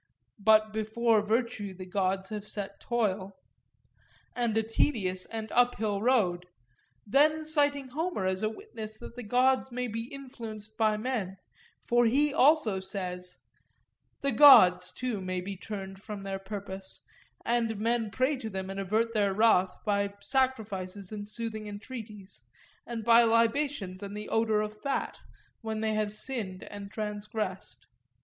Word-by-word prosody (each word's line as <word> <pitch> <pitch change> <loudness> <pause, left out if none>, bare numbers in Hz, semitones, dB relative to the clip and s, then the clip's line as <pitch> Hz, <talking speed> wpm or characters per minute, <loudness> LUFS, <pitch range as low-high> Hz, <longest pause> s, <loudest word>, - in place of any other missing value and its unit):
But 215 +1 +4
before 220 +1 +2
virtue 215 -2 -1
the 185 0 -8
gods 190 0 -1
have 210 -1 -5
set 200 -1 -5
toil,' 200 -5 -1 1.0
and 235 -3 0
a 225 - +3
tedious 205 -5 0
and 220 -1 -6
uphill 220 -4 +2
road: 190 -8 +2 0.6
then 305 +8 +3
citing 285 -3 +1
Homer 315 - -2
as 185 +1 0
a 215 - +1
witness 220 - -8
that 235 - -10
the 245 - -6
gods 255 +3 +2
may 250 +1 -2
be 230 0 -4
influenced 230 -5 -9
by 215 -1 +2
men; 215 -5 -3 0.5
for 240 0 +3
he 285 +5 +2
also 285 -9 +4
says:— 180 -2 -5 0.8
'The 275 - +1
gods, 185 -9 +8
too, 245 -6 -3
may 185 0 -2
be 195 +2 -5
turned 195 -1 -7
from 210 -1 -7
their 195 0 -4
purpose; 195 -1 -5 0.4
and 230 -2 +1
men 230 0 0
pray 260 +7 +1
to 225 -4 -5
them 190 -1 -4
and 195 - -5
avert 220 +4 0
their 200 -3 +1
wrath 190 -4 +4
by 200 -1 0
sacrifices 205 -8 -1
and 205 -1 -6
soothing 220 -1 -4
entreaties, 210 -2 -8 0.5
and 235 -2 -4
by 235 0 +7
libations 230 -3 +1
and 200 0 -6
the 210 - -6
odour 220 -1 +2
of 215 0 -5
fat, 280 -1 -2 0.4
when 220 -1 -3
they 220 0 0
have 215 -1 0
sinned 215 -4 -5
and 200 -1 -8
transgressed. 210 -2 -5
215 Hz, 145 wpm, -29 LUFS, 195-235 Hz, 1.0 s, gods